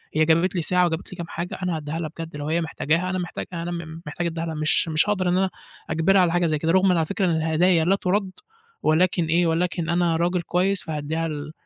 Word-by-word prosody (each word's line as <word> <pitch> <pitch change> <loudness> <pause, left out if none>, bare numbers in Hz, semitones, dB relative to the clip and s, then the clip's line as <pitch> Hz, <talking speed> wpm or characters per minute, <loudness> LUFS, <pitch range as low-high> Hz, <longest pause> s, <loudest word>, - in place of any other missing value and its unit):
هي 155 0 +4
جابت 170 +4 +2
لي 175 - +1
ساعة، 180 +2 +2
وجابت 165 +1 -3
لي 185 - -9
كام 170 - -5
حاجه، 170 +2 -5
أنا 180 -2 0
هادّيها 155 +2 -4
لها 160 - -3
بجد 165 -2 -6
لو 145 0 -5
هي 165 +2 +1
محتاجاها 165 +2 -1
أنا 185 0 -1
محتاج 175 - -5
أنا 170 -1 -5
محتاج 160 +4 -4
ادّيها 165 0 -3
لها، 160 - -4
مش 155 +2 +2
مش 160 +5 +2
هاقدر 185 -3 +1
إن 180 - +2
أنا 190 0 +2 0.4
أجبرها 165 +5 +3
على 175 -2 +3
حاجه 175 0 +2
زي 155 -2 +1
كده، 160 +2 0
رُغمًا 190 0 +4
على 160 - +2
فكرة 200 +3 -1
إن 175 - +2
الهدايا 160 +1 +2
لا 195 - +4
تُرَدّ، 195 0 -1 0.5
ولكن 170 +2 +2
إيه 170 +2 +2
ولكن 170 0 -1
أنا 170 -1 +2
راجل 175 +2 +1
كويس، 185 +3 0
فهادّيها 160 +1 -3
ال 150 -1 -5
170 Hz, 235 wpm, -24 LUFS, 160-180 Hz, 0.5 s, هي